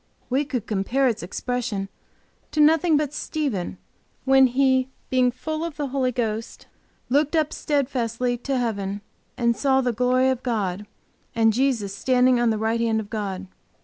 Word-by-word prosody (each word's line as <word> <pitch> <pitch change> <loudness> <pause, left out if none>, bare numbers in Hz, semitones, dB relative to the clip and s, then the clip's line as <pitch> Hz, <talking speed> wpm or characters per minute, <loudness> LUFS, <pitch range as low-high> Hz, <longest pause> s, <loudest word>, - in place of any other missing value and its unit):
We 275 +3 +2
could 250 -6 -3
compare 230 +7 +1
its 225 -3 -1
expression 220 +1 -3 0.6
to 305 - -4
nothing 315 +1 +5
but 295 -1 -1
Stephen, 270 - -3 0.5
when 265 0 +6
he, 260 0 +2 0.2
being 255 -1 +4
full 310 +6 -4
of 335 -3 -5
the 290 -3 -2
Holy 260 -1 0
Ghost, 225 -2 -3 0.4
looked 290 +4 +2
up 310 -1 +1
steadfastly 250 -4 -1
to 270 +2 -2
heaven 205 -4 -2 0.4
and 235 -1 +2
saw 265 0 +2
the 250 -2 0
glory 250 +3 +2
of 260 -1 -3
God, 205 -5 -2 0.5
and 225 -1 +4
Jesus 235 -5 0
standing 250 +3 +3
on 240 -1 +3
the 220 - +1
right 225 +2 0
hand 225 -1 +1
of 210 -1 -7
God. 195 -3 -3
250 Hz, 160 wpm, -24 LUFS, 220-270 Hz, 0.6 s, when